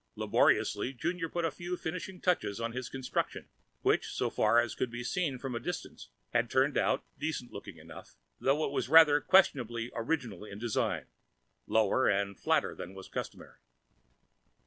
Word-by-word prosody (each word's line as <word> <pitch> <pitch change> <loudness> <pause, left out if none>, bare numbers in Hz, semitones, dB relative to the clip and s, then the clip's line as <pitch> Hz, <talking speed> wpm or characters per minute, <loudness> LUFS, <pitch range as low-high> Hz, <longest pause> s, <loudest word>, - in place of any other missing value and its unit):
Laboriously 130 - +2
Junior 165 +5 -2
put 170 0 -1
a 165 - 0
few 175 +5 -5
finishing 180 +3 -5
touches 170 - 0
to 115 0 -2
his 125 0 -5
construction 130 -1 -3 0.3
which, - - +2
so - - -1
far 110 +2 +4
as 120 -2 0
could 125 - -2
be 120 +1 -6
seen 150 0 -1
from 130 0 -5
a 120 - -2
distance, 175 +8 -6 0.2
had 120 -1 +2
turned 135 +2 +2
out - - +1
decent 150 -5 -3
looking 100 -3 -9
enough, 80 - -12 0.2
though 145 +4 +2
it - - -3
was 130 - -1
rather 150 -2 +7
questionably 125 - +3
original 115 - -2
in 100 -1 -9
design: 115 0 -1 0.6
lower 110 +4 +3
and 100 0 0
flatter - - +1
than 95 +2 -8
was 95 - -10
customary. - - -7
130 Hz, 165 wpm, -31 LUFS, 115-160 Hz, 0.6 s, rather